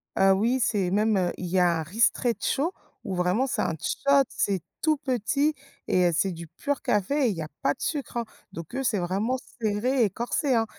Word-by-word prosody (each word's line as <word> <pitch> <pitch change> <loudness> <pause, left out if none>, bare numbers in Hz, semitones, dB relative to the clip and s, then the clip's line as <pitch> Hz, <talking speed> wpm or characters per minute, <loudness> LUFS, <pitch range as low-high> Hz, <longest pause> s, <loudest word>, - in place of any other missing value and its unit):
Ah 195 0 +5
oui, 235 +6 +1
c'est 200 -6 +1
même, 210 +2 +2
heu, 180 -2 +1
il 185 - -5
y 180 +2 -1
a 170 -2 +3
un - - -2
ristretto 240 - +1 0.3
où 195 -4 -3
vraiment 180 +9 +1
c'est - - -1
un - - 0
shot, 280 0 +3
c'est 195 -3 -1 0.2
tout 310 -1 +3
petit 280 +2 0 0.3
et 180 -1 +3
heu, - - +2
c'est 190 +4 +1
du 170 0 -8
pur 285 - -3
café 260 +7 +1
et - - +2
il 200 - -2
y 165 - -4
a - - -6
pas 140 - +2
de - - -19
sucre 280 -6 -3
hein. 235 - -1 0.3
Donc 165 +3 -9
eux, 270 - -1
c'est 230 -5 +1
vraiment 200 +9 0 0.2
serré 230 +4 +1
et 205 - +3
corsé 245 - -1
hein 225 -1 +3
220 Hz, 220 wpm, -26 LUFS, 185-260 Hz, 0.3 s, Ah